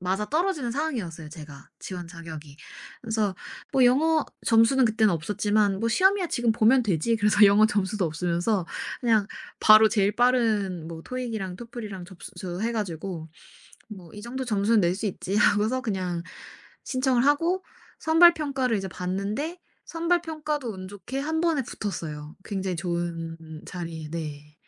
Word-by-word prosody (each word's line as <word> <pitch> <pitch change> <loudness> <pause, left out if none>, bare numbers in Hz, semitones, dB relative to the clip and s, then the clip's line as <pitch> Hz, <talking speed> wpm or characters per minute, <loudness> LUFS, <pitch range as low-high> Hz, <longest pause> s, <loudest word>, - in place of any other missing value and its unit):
맞아떨어지는 245 - -1
상황이었어요 225 - -3
제가. 150 -3 -11
지원 180 -2 -6
자격이. 160 -4 -10 0.5
그래서 220 -4 -1 0.4
뭐 265 -2 +4
영어 310 +5 +3 0.2
점수는 230 +3 +5
그땐 220 -2 +3
없었지만 205 +4 0
'뭐 230 - +1
시험이야 380 - +3
지금 240 -2 +1
보면 230 +3 +4
되지.' 200 +4 +1
그래서 210 0 +5
영어 205 +2 +6
점수도 205 -2 -1
없으면서 175 +5 0 0.4
그냥 220 -5 +2 0.3
바로 215 0 +7
제일 205 -2 +1
빠른 220 -9 +1
뭐 165 -1 -8
토익이랑 225 -7 -4
토플이랑 215 -6 -7
접수해 185 +3 -5
가지고 180 -6 -4 0.7
뭐 175 -3 -13
'이 210 - -10
정도 260 +4 -4
점수는 215 -1 +2
낼 175 +1 +2
수 210 +3 -3
있지.' 195 0 -4
하고서 210 +4 +3
그냥 185 -7 -3 0.6
신청을 255 -2 +1
하고 335 +6 +2 0.3
선발 340 +2 +6
평가를 265 -6 -1
이제 195 - -3
봤는데 200 - -3 0.3
선발 335 +1 0
평가도 305 -5 -3
운 185 -1 -8
좋게 205 +7 -6
1 320 +2 -1
번에 325 -5 +1
붙었어요 155 -9 -6
굉장히 190 -3 -3
좋은 170 -1 -3 0.3
자리에. 165 -3 -6
네. 150 -2 -6
210 Hz, 325 characters per minute, -26 LUFS, 180-255 Hz, 0.7 s, 바로